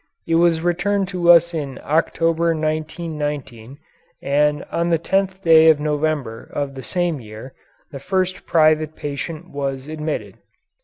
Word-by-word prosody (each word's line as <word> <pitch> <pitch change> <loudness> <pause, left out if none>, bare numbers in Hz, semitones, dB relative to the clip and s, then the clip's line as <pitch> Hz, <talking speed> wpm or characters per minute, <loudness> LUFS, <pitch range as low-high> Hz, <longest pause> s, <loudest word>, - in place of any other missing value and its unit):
It 165 - -2
was 165 -1 +3
returned 185 +3 0
to 175 -2 0
us 170 0 +6
in 140 -5 -4
October, 165 +2 +1
1919, 150 -5 -4 0.4
and 150 +1 +1
on 170 0 0
the 165 - +3
tenth 190 +3 -1
day 160 -1 +7
of 155 -2 +4
November 150 -6 -2
of 140 -1 -3
the 135 - -8
same 175 0 -1
year 110 +3 -10 0.4
the 140 - -7
first 185 +4 -2
private 155 -1 +3
patient 155 +4 -6
was 135 -1 -4
admitted. 155 0 -5
155 Hz, 140 wpm, -20 LUFS, 145-170 Hz, 0.4 s, day